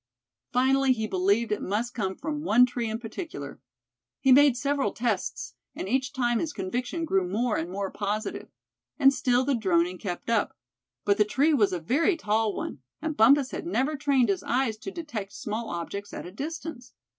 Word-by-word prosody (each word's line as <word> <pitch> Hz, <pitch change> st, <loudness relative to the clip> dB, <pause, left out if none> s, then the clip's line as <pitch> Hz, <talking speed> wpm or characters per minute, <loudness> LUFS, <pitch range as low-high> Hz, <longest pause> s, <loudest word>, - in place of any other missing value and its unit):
Finally 265 Hz, +1 st, +3 dB
he 220 Hz, -3 st, -2 dB
believed 200 Hz, +3 st, +1 dB
it 210 Hz, -, -1 dB
must 225 Hz, +5 st, -2 dB
come 190 Hz, -4 st, -2 dB
from 300 Hz, -2 st, -4 dB
one 250 Hz, -5 st, +5 dB
tree 245 Hz, -2 st, -3 dB
in 220 Hz, -, -2 dB
particular. 250 Hz, +9 st, -7 dB, 0.6 s
He 265 Hz, -, +3 dB
made 275 Hz, -1 st, +6 dB
several 280 Hz, +2 st, 0 dB
tests, 225 Hz, -5 st, -2 dB, 0.2 s
and -, -, -5 dB
each 255 Hz, +3 st, 0 dB
time 240 Hz, -3 st, +1 dB
his 315 Hz, -3 st, -2 dB
conviction 245 Hz, -, -3 dB
grew 195 Hz, -, +1 dB
more 225 Hz, +4 st, 0 dB
and 165 Hz, +2 st, -2 dB
more 195 Hz, +1 st, -3 dB
positive. 210 Hz, +2 st, -3 dB, 0.5 s
And 275 Hz, -2 st, +6 dB
still 255 Hz, -1 st, +2 dB
the 280 Hz, -, +2 dB
droning 180 Hz, -5 st, +1 dB
kept 180 Hz, -5 st, -5 dB
up. 230 Hz, -, 0 dB, 0.5 s
But 200 Hz, 0 st, +2 dB
the -, -, +7 dB
tree 280 Hz, +9 st, +2 dB
was 215 Hz, -8 st, +3 dB
a 180 Hz, -, -2 dB
very 300 Hz, -, +2 dB
tall 215 Hz, -5 st, 0 dB
one, 130 Hz, -, -5 dB, 0.2 s
and 315 Hz, 0 st, -3 dB
Bumpus 265 Hz, +4 st, +5 dB
had -, -, -5 dB
never 300 Hz, -1 st, 0 dB
trained 275 Hz, -5 st, +2 dB
his 195 Hz, -, +1 dB
eyes 245 Hz, -2 st, 0 dB
to 300 Hz, -, -7 dB
detecting 240 Hz, -, -6 dB
small 220 Hz, +2 st, -4 dB
objects 200 Hz, +4 st, -5 dB
at -, -, -6 dB
a 175 Hz, -, -8 dB
distance. 290 Hz, -, -6 dB
240 Hz, 185 wpm, -27 LUFS, 205-275 Hz, 0.6 s, the